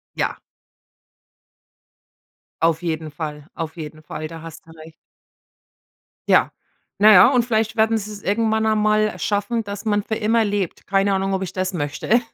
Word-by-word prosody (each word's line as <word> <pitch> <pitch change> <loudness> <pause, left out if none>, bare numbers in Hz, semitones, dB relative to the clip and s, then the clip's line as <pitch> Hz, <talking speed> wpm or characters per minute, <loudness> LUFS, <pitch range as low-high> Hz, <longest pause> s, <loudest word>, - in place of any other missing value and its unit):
Ja. - - -2 2.2
Auf 165 -1 +2
jeden 160 -2 -3
Fall, 150 -1 -7
auf 160 0 -5
jeden 155 -1 -8
Fall. 155 +1 -6
Da 165 0 -9
hast 165 -1 -11
du 165 - -18
recht. 160 0 -13 1.4
Ja. - - +4 0.5
Na 215 +1 +7
ja, 180 +4 +8
und 250 -3 +2
vielleicht 220 -2 0
werden 220 0 +3
sie 210 +1 -7
es 205 - -10
irgendwann 220 +1 +1
einmal 215 0 +2
schaffen, 210 +3 -1
dass 200 -1 -7
man 205 -2 +1
für 220 - -2
immer 225 +1 +2
lebt. 205 -4 -3
Keine 195 +1 +2
Ahnung, 195 0 0
ob 190 - -2
ich 185 -2 -4
das 185 0 -2
möchte. 155 +10 0
200 Hz, 160 wpm, -21 LUFS, 165-215 Hz, 2.2 s, ja